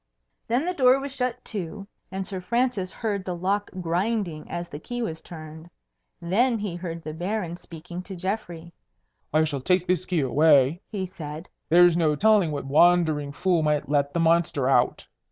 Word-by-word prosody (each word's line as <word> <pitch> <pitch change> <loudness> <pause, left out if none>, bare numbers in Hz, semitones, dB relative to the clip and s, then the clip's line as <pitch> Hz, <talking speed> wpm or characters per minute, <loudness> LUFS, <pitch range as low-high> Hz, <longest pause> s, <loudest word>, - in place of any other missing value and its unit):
Then 245 +7 +1
the 360 - -1
door 260 -4 +4
was 275 0 -6
shut 250 -1 -2
to, 200 -1 -5 0.3
and 190 0 -3
Sir 185 -1 -5
Francis 225 -2 0
heard 205 -4 -3
the 180 -1 -4
lock 195 +4 -1
grinding 175 -1 -2
as 175 0 -4
the 145 - -8
key 245 +8 -4
was 160 -6 -4
turned. 160 -1 -10 0.5
Then 225 +8 +2
he 205 -5 -4
heard 170 -2 -6
the 155 - -5
Baron 175 +1 -3
speaking 175 +1 -9
to 190 +1 -8
Geoffrey. 175 -3 -4 0.6
"I 155 +1 +3
shall 145 -3 -2
take 180 +5 +2
this 185 0 0
key 175 -4 +1
away," 145 +3 +4
he 195 -4 -3
said; 160 -3 -8 0.2
"there's 175 0 +6
no 160 -3 +2
telling 210 0 +4
what 145 -2 -4
wandering 155 -1 +3
fool 175 +3 +1
might 150 -2 0
let 145 -1 +1
the 170 - -1
monster 165 -5 +2
out. 125 -2 +2
175 Hz, 175 wpm, -25 LUFS, 155-200 Hz, 0.6 s, there's